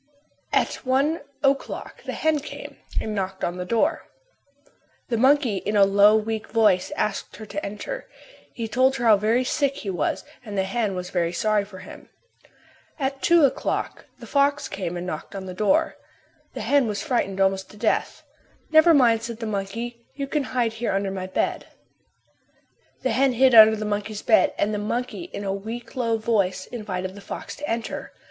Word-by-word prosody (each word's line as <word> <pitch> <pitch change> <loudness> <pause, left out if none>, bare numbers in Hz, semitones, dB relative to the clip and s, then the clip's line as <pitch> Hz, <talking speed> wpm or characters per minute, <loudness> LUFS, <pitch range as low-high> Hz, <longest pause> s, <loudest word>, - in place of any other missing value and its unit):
At - - +1
one 275 +5 +1 0.2
o'clock 275 0 -1
the - - -4
hen 315 -1 +1
came 280 - -9 0.2
and 215 - -3
knocked 190 -2 -3
at 175 - -1
the 180 0 -4
door. 230 +4 0 1.0
The 235 - +1
monkey 260 -3 +3
in 210 +3 -2
a 200 - +7
low, 200 +2 +6
weak 220 0 -1
voice 210 -5 +3
asked 210 -2 -2
her 220 - -9
to 300 +8 -5
enter. - - -6 0.4
He 230 -2 -4
told 260 +4 +3
her 240 -3 -2
how 220 -2 +7
very 225 +5 +2
sick 275 +1 0
he 200 - -4
was 165 -5 -1 0.2
and 210 -3 -6
the 190 - +2
hen 200 0 -1
was 180 0 -5
very 170 -2 0
sorry 210 +3 +1
for 200 -2 -12
him. - - -12 0.9
At 275 -2 -2
two 340 -3 +5
o'clock 270 - -2
the - - -11
fox 285 +1 +1
came 185 -3 -4
and 175 - -5
knocked 180 +1 -6
at 190 -1 -5
the 185 - -6
door. 195 +1 +1 0.6
The - - -4
hen 280 -4 +3
was 210 -1 -3
frightened 235 -10 -1
almost 190 0 +1
to 210 - -14
death. - - 0 0.5
"Never 315 +1 +7
mind," 235 -5 +4
said 230 -1 -5
the 230 - -4
monkey, 225 +4 -4
"you 280 -1 -3
can 280 0 -1
hide 240 -3 0
here 225 -1 -2
under 195 0 -1
my 185 -1 -4
bed." 185 - -2 1.4
The 260 - +1
hen 265 +2 +3
hid 260 +1 +4
under 220 -1 +9
the 215 0 -4
monkey's 210 0 -3
bed 225 - +4
and 210 +1 0
the 210 - -1
monkey 245 +10 -3
in 205 - -7
a 195 -1 -1
weak, 230 +5 -7
low 230 -3 +1
voice 200 -5 0
invited 185 -5 -5
the 200 - -11
fox - - -7
to 295 - -5
enter. 230 0 -4
220 Hz, 185 wpm, -24 LUFS, 195-255 Hz, 1.4 s, under